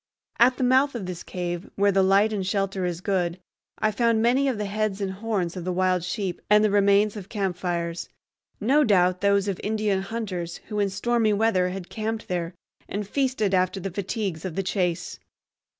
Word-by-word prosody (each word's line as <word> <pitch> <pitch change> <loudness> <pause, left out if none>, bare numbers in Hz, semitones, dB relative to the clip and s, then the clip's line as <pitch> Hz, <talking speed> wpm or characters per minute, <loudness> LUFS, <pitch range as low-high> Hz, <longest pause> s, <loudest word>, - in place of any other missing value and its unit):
At 250 +2 +5
the - - -1
mouth 260 +2 +3
of 215 -6 -4
this 180 -2 -6
cave, 175 +1 -5
where 200 0 +3
the 195 0 +3
light 200 +3 +4
and 200 -2 -1
shelter 195 -1 -1
is 175 0 -4
good, 180 -3 -1 0.4
I 215 0 +1
found 230 +1 +2
many 250 +5 +3
of 255 -5 0
the 210 - -2
heads 210 0 -1
and 195 -2 -2
horns 195 -3 -2
of 180 - -5
the 185 - -2
wild 185 -1 +1
sheep, 180 0 -3
and 210 0 +6
the 215 - +3
remains 200 +1 +4
of 200 -2 -8
campfires, 175 -4 -2 0.5
no 270 +8 +3
doubt 185 -6 +3
those 200 0 +3
of 195 -3 -2
Indian 210 -2 0
hunters 190 -5 -4
who 210 -1 -2
in 200 -1 +2
stormy 220 +2 +1
weather 200 -4 +2
had 180 -1 -6
camped 220 0 -4
there 175 -1 -2 0.3
and 205 0 -3
feasted 255 -5 0
after 185 +1 +1
the 195 +1 -4
fatigues 195 -3 -3
of 185 -4 -5
the 195 - -1
chase. 180 -3 -2
200 Hz, 195 wpm, -25 LUFS, 185-215 Hz, 0.5 s, and